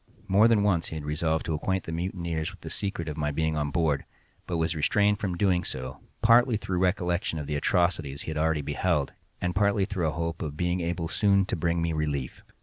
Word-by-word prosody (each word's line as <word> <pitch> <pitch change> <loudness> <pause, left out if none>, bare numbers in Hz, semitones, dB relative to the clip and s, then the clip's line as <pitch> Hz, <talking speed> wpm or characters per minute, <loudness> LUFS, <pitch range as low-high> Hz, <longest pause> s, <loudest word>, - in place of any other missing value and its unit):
More 100 +4 +5
than 110 -3 +3
once 90 -5 +2
he - - -6
had 75 -2 -5
resolved 80 +1 0
to 80 - -1
acquaint 95 +4 -1
the - - -6
mutineers 85 -1 -2
with 95 -1 -14
the - - -7
secret 95 -5 -3
of 75 -1 -4
my 75 -1 0
being 80 +2 0
on 75 -1 -1
board, 75 -2 +1 0.4
but 85 - -1
was 80 0 0
restrained 100 +7 +2
from 95 -3 -2
so - - -3
doing, 90 -2 +2 0.6
partly 120 0 +5
through 95 -3 -2
recollection 90 -3 0
of 75 - -4
the 75 - -3
atrocities 80 -3 0
he - - -4
had 80 - -4
already 80 -1 +1
beheld, 75 0 0 0.3
and 90 0 -1
partly 100 0 +2
through 95 -5 -1
a - - 0
hope 85 -1 -3
of 75 -2 -4
being 90 +1 0
able 85 0 -2
soon 100 +1 +3
to - - -2
bring 85 0 0
me 85 -1 0
relief. 75 -4 -2
85 Hz, 225 wpm, -27 LUFS, 80-95 Hz, 0.6 s, More